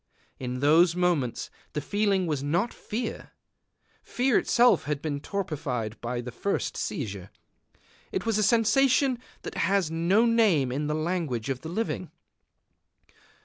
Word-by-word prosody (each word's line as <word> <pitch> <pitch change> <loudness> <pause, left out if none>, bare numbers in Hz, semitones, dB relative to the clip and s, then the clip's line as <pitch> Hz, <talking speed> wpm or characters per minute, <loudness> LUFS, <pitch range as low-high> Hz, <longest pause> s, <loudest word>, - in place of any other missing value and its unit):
In 125 0 -4
those 165 +4 +5
moments 175 -9 0 0.2
the - - -1
feeling 200 +3 +1
was 150 -5 -1
not 170 +11 0
fear: 225 +2 -5 0.7
fear 250 -1 +1
itself 245 +1 +4
had 150 -1 -1
been 145 -1 -3
torpified 145 - -4
by 120 +1 -3
the 125 +1 -7
first 200 +11 -2
seizure. 100 - -4 0.8
It 185 - -2
was 225 -2 +1
a - - +3
sensation 255 +4 +3 0.2
that - - -6
has 190 -3 +1
no 175 +8 +3
name 210 - +3
in 145 +3 -2
the 150 - -1
language 155 -7 -2
of 130 -1 -4
the 160 - -7
living. 160 - -3
165 Hz, 140 wpm, -27 LUFS, 140-210 Hz, 0.8 s, those